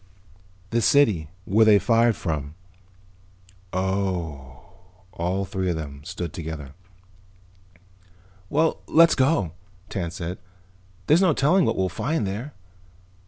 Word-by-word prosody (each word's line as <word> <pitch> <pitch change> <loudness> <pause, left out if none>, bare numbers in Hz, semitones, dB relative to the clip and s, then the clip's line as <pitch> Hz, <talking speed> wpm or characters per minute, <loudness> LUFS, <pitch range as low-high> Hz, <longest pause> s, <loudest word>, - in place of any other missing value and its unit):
"The 115 - +1
city. 110 - +3 0.2
Where 110 +4 +4
they 110 -2 +6
fired 115 +1 +3
from." 75 -3 -4 1.2
"Oh." 90 -8 -3 0.5
All 95 +3 -2
three 95 0 -2
of 85 - 0
them 70 -3 -7
stood 90 -2 -6
together. 80 -4 -7 1.8
"Well, 160 +2 +1
let's 165 0 +6
go," 130 - +2 0.4
Tance 85 -3 -4
said. 90 0 -5 0.7
"There's 160 - +4
no 185 -5 +4
telling 175 +7 +3
what - - 0
we'll 95 - +1
find 115 - -2
there." 110 +9 -5
95 Hz, 115 wpm, -24 LUFS, 80-120 Hz, 1.8 s, they